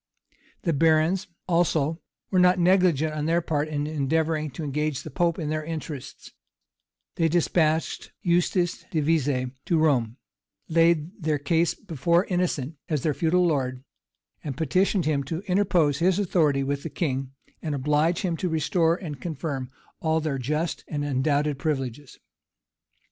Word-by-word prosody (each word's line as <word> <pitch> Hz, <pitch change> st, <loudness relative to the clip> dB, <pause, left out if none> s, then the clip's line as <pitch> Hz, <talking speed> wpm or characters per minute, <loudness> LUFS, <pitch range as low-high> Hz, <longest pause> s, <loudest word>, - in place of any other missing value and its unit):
[] -, -, -34 dB
The 170 Hz, -, +1 dB
barons, 165 Hz, +6 st, +3 dB, 0.2 s
also, 165 Hz, -2 st, +1 dB, 0.3 s
were 185 Hz, -, +3 dB
not 180 Hz, +1 st, +5 dB
negligent 175 Hz, -4 st, +3 dB
on 150 Hz, 0 st, -2 dB
their 165 Hz, +1 st, +3 dB
part 155 Hz, -3 st, -1 dB
in 145 Hz, -1 st, -2 dB
endeavoring 155 Hz, +1 st, 0 dB
to 160 Hz, -, -4 dB
engage 150 Hz, -1 st, -2 dB
the -, -, -8 dB
pope 170 Hz, -2 st, +1 dB
in 155 Hz, -4 st, -3 dB
their 155 Hz, 0 st, -1 dB
interests: 155 Hz, -4 st, -7 dB, 0.9 s
they 165 Hz, -, +3 dB
despatched 160 Hz, -1 st, +1 dB
Eustace 175 Hz, 0 st, +1 dB
de 160 Hz, -, 0 dB
Vescie 145 Hz, -5 st, +1 dB
to 170 Hz, -, +2 dB
Rome; 130 Hz, -7 st, +2 dB, 0.5 s
laid 165 Hz, 0 st, +3 dB
their 155 Hz, -1 st, +1 dB
case 160 Hz, +4 st, +1 dB
before 170 Hz, -, +1 dB
Innocent 165 Hz, -5 st, -1 dB
as 150 Hz, -5 st, -1 dB
their 155 Hz, -, +1 dB
feudal 175 Hz, +4 st, +2 dB
lord; 130 Hz, -5 st, -1 dB, 0.6 s
and 135 Hz, -4 st, -5 dB
petitioned 185 Hz, +2 st, +1 dB
him 145 Hz, -2 st, +1 dB
to 160 Hz, +5 st, -4 dB
interpose 180 Hz, -7 st, +2 dB
his 180 Hz, +2 st, +3 dB
authority 160 Hz, -8 st, +2 dB
with 140 Hz, +1 st, -2 dB
the 165 Hz, -, -5 dB
king, 135 Hz, -5 st, -2 dB, 0.3 s
and 155 Hz, -3 st, -2 dB
oblige 150 Hz, +5 st, +1 dB
him 180 Hz, -4 st, -1 dB
to 180 Hz, -, -1 dB
restore 165 Hz, +1 st, +2 dB
and 155 Hz, -7 st, -7 dB
confirm 145 Hz, -5 st, -4 dB, 0.3 s
all 160 Hz, 0 st, +1 dB
their 150 Hz, -4 st, -2 dB
just 150 Hz, +6 st, -2 dB
and 145 Hz, -1 st, -3 dB
undoubted 145 Hz, +1 st, 0 dB
privileges. 140 Hz, -2 st, -3 dB
155 Hz, 150 wpm, -25 LUFS, 145-170 Hz, 0.9 s, not